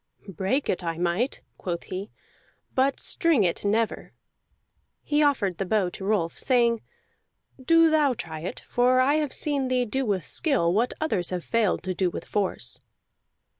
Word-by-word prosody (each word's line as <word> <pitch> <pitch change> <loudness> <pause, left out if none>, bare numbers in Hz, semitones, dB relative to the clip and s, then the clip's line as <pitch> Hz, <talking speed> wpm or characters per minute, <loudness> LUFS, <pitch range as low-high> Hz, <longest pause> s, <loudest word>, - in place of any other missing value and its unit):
"Break 195 - 0
it 180 - -1
I 165 -1 -2
might," 175 +9 -1 0.2
quoth 170 -2 -3
he, 190 +3 -6 0.6
"but 265 +1 +2
string 330 - +2
it 175 -2 -1
never." 220 +2 -1 0.9
He 295 0 +1
offered 220 - +1
the - - +1
bow 200 -2 +2
to 190 - -9
Rolf, 195 -5 0
saying: 235 -3 +2 0.8
"Do 330 +2 +5
thou 295 -5 +3
try 160 -6 -6
it, 170 - -6
for 250 +1 +3
I 280 +4 +4
have 300 -3 -1
seen 285 -3 -1
thee 255 -1 +1
do 265 +4 -1
with 195 - -1
skill 235 - +1
what 230 +5 +1
others 195 - 0
have 180 -2 -4
failed 225 -7 +1
to 185 0 -2
do 185 0 +1
with - - -7
force." 200 -2 -2
220 Hz, 165 wpm, -26 LUFS, 185-270 Hz, 0.9 s, Do